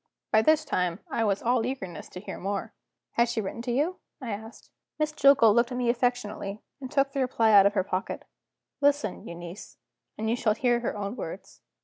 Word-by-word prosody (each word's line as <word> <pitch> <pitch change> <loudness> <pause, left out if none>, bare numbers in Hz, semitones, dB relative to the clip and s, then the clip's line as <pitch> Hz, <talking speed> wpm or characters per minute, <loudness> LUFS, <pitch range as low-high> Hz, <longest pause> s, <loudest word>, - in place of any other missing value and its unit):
By 220 - +5
this 310 +5 +3
time, 180 -8 -1
I 230 - +1
was 200 -2 0
all 240 0 +2
eagerness 230 -8 -5
to 180 - -8
hear 200 - -7
more. 200 +1 -3 0.4
"Has 235 0 +2
she 230 - -1
written 220 +2 -4
to 245 +1 -3
you?" 300 +9 0 0.2
I 250 -5 -5
asked. 220 +3 -8 0.3
Miss 305 0 0
Jillgall 275 -7 +6
looked 235 +2 +3
at 245 - -3
me 245 -1 +2
affectionately, 235 -5 -2 0.2
and 260 -2 -7
took 275 -1 +2
the 275 - -3
reply 235 -4 +2
out 200 -1 +8
of 205 - -2
her 190 - +2
pocket. 185 0 -3 0.6
"Listen, 285 0 +1
Euneece; 170 +3 -9 0.4
and 220 - -2
you 225 - +2
shall 215 -3 +1
hear 240 0 +2
her 235 -3 -3
own 200 +2 -3
words. - - -8
230 Hz, 205 wpm, -27 LUFS, 205-255 Hz, 0.6 s, out